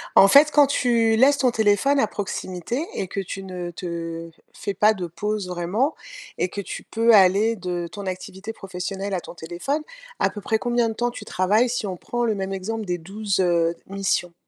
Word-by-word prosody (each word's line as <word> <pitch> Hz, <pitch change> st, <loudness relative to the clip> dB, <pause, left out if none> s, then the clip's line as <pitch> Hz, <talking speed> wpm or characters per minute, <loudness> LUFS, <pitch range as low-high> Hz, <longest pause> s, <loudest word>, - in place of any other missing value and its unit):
En 195 Hz, -, +9 dB
fait, 285 Hz, +8 st, +7 dB
quand 295 Hz, -1 st, +6 dB
tu 235 Hz, -5 st, +2 dB
laisses 280 Hz, +4 st, +5 dB
ton 255 Hz, -3 st, +3 dB
téléphone 225 Hz, +6 st, +3 dB
à 220 Hz, -, +3 dB
proximité 200 Hz, -, -4 dB
et 190 Hz, -, -2 dB
que 195 Hz, -, -4 dB
tu 195 Hz, 0 st, -5 dB
ne 180 Hz, -2 st, -5 dB
te 165 Hz, -1 st, -5 dB
f -, -, -31 dB, 0.2 s
fais 200 Hz, -, -4 dB
pas 210 Hz, +3 st, +4 dB
de 185 Hz, -4 st, -4 dB
pause 210 Hz, +3 st, -3 dB
vraiment 180 Hz, -, 0 dB, 0.4 s
et 180 Hz, -, 0 dB
que 200 Hz, -, -4 dB
tu -, -, -7 dB
peux 230 Hz, +1 st, +3 dB
aller 205 Hz, +3 st, +5 dB
de 175 Hz, -3 st, -3 dB
ton 200 Hz, +2 st, -8 dB
activité 190 Hz, +3 st, -6 dB
professionnelle 195 Hz, 0 st, -5 dB
à 180 Hz, -, -1 dB
ton -, -, -11 dB
téléphone, 175 Hz, -, -3 dB, 0.4 s
à -, -, +3 dB
peu 205 Hz, -, -8 dB
près 220 Hz, +2 st, +1 dB
combien 240 Hz, 0 st, +1 dB
de 225 Hz, -, -3 dB
temps 240 Hz, +2 st, 0 dB
tu -, -, -9 dB
travailles, 210 Hz, +7 st, +2 dB
si 240 Hz, -2 st, -2 dB
on 190 Hz, -2 st, -3 dB
prend 240 Hz, +6 st, -2 dB
le 225 Hz, -, +1 dB
même 195 Hz, 0 st, -3 dB
exemple 215 Hz, +3 st, -4 dB
des 180 Hz, -2 st, -1 dB
12, 195 Hz, +4 st, -3 dB
heu, 170 Hz, -2 st, +2 dB
missions? 195 Hz, -3 st, -1 dB
200 Hz, 205 wpm, -23 LUFS, 180-225 Hz, 0.4 s, En